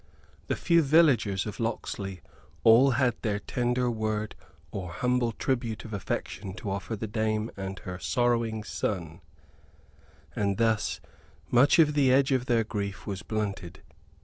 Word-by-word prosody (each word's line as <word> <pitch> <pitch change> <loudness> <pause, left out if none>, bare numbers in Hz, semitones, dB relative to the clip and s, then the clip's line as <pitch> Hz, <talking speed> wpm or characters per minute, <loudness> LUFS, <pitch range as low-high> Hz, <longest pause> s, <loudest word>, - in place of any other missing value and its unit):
The - - 0
few 170 -1 +3
villagers 135 - +3
of 105 - -6
Locksley 100 -5 -3 0.4
all 125 +4 +6
had 130 -3 +3
their 105 -2 0
tender 125 +3 -1
word 110 -1 -2 0.4
or 90 -3 -5
humble 125 +2 +1
tribute 120 -3 -2
of 110 - -8
affection 95 -1 -4
to 105 -2 -5
offer 100 +3 -3
the 110 - -4
dame 110 +1 -1
and 95 0 -5
her 90 0 -7
sorrowing 115 -2 0
son; 90 -5 -3 1.1
and 100 -2 0
thus 110 -7 +1 0.5
much 125 +4 +5
of 155 -3 +5
the 140 -3 +4
edge 135 +2 +4
of 130 -1 +1
their 115 -2 +3
grief 100 -2 -4
was 100 -2 -4
blunted. 100 -6 -4
110 Hz, 145 wpm, -28 LUFS, 100-125 Hz, 1.1 s, all